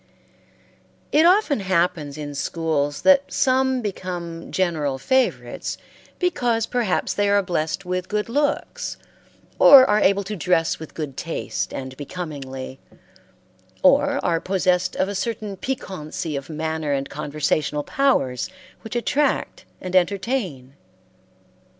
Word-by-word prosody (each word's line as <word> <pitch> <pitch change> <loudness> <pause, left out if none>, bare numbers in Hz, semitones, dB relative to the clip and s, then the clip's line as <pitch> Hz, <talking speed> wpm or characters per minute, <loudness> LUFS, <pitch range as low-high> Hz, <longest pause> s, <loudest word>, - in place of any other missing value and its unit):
It 315 +3 +5
often 360 - +3
happens 175 -6 0
in 145 -1 -6
schools 145 -1 -1
that 280 0 +5
some 260 -1 +2
become 175 -4 -5
general 155 -7 0
favorites 260 - 0 0.4
because 245 - +1
perhaps 235 -7 0
they 205 0 +1
are 200 0 +3
blessed 175 +1 -2
with 180 0 -3
good 210 0 -1
looks, 290 +4 -1 0.6
or 270 -2 +10
are 210 0 +3
able 200 0 +3
to 210 +2 -5
dress 170 -2 +1
with 160 - -10
good 150 -4 -5
taste 165 -1 -3
and 130 0 -6
becomingly, 140 -5 -6 1.0
or 285 +1 +4
are 165 -1 +1
possessed 185 -1 +1
of 190 - +1
a 200 - -3
certain 210 0 -3
piquancy 180 - -4
of 140 -1 -5
manner 160 -1 -2
and 135 0 -1
conversational 150 0 -1
powers 145 - +1 0.3
which 225 - -8
attract 275 +4 0
and 185 0 -5
entertain. 185 - 0
185 Hz, 120 wpm, -23 LUFS, 155-230 Hz, 1.0 s, or